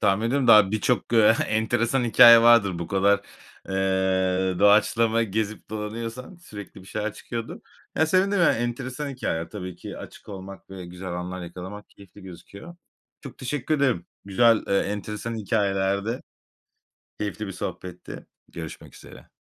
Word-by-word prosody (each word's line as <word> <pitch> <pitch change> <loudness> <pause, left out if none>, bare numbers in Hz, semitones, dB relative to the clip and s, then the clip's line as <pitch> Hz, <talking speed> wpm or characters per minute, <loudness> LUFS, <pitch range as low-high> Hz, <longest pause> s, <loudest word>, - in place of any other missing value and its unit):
tahmin 105 +2 +2
ediyorum 135 +1 0
daha 105 -4 +7
birçok, 120 +3 -1
eee, 110 -1 +6
enteresan 120 +3 0
hikâye 115 +1 +8
vardır 110 -7 +5
bu 85 - -4
kadar, 100 +1 +2 0.5
eee, 95 -1 0
doğaçlama 110 +3 +4
gezip 110 0 -4
dolanıyorsan 115 - -6
sürekli 105 - -11
bir - - -17
şeyler 105 +2 -3
çıkıyordur. 115 -1 -7 0.3
Ya 160 - +2
sevindim, 195 +4 +2
yani 170 - +4
enteresan 125 +4 -4
hikâyeler 85 -11 -3
tabii 90 -4 -7
ki. - - -9
Açık - - -12
olmak 95 -1 -10
ve 95 -2 -8
güzel 90 +1 -7
anlar 90 +1 -5
yakalamak 90 +4 -9
keyifli 100 0 -17
gözüküyor. 100 - -12 0.4
Çok 135 -4 -11
teşekkür 130 +3 -2
ederim. 130 -11 0 0.2
Güzel, 115 +3 +3
eee, 100 - +3
enteresan 105 +3 -4
hikâyelerdi, 100 +1 -1 1.0
keyifli 105 0 -4
bir 95 - -5
sohbetti. 90 -1 -7 0.2
Görüşmek 80 -2 -9
üzere. - - -15
105 Hz, 140 wpm, -24 LUFS, 95-115 Hz, 1.0 s, hikâye